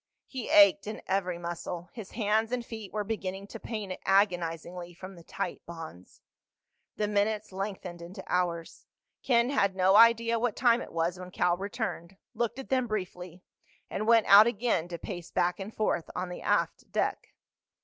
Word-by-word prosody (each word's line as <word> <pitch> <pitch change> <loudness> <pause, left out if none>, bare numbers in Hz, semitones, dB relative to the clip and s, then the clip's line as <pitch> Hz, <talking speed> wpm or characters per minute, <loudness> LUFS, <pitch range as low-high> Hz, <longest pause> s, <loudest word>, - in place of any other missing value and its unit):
He 260 -4 -6
ached 300 -4 +6
in 215 - -6
every 185 -2 -1
muscle. 175 0 -6
His 220 -5 -8
hands 220 +1 +1
and 245 -1 -2
feet 220 -4 -8
were 210 -1 -2
beginning 195 -2 -4
to - - -8
pain 210 -5 -5
agonizingly 175 -2 0
from 185 +2 -9
the 170 - -13
tight 185 +1 -4
bonds. 160 - -10 0.7
The 210 - 0
minutes 210 +1 0
lengthened 190 -3 -5
into 170 +3 -9
hours. 170 -2 -2 0.3
Ken 240 0 +2
had 200 -9 +2
no 190 +1 +4
idea 230 +1 +6
what 240 -1 0
time 240 -1 +3
it - - -8
was 170 +2 -1
when 180 0 -8
Cal 180 -1 +1
returned, 195 -3 -5 0.2
looked 235 +1 -2
at 270 - -8
them 255 -2 +1
briefly, 180 -4 -5 0.5
and 215 - -2
went 230 -1 +6
out 205 +3 +9
again 225 -7 0
to 175 -1 -6
pace 175 0 -7
back 175 +2 0
and 195 +2 -6
forth 215 -7 -1
on 180 0 -3
the 180 - -7
aft - - 0
deck. - - -2
195 Hz, 170 wpm, -29 LUFS, 175-225 Hz, 0.7 s, out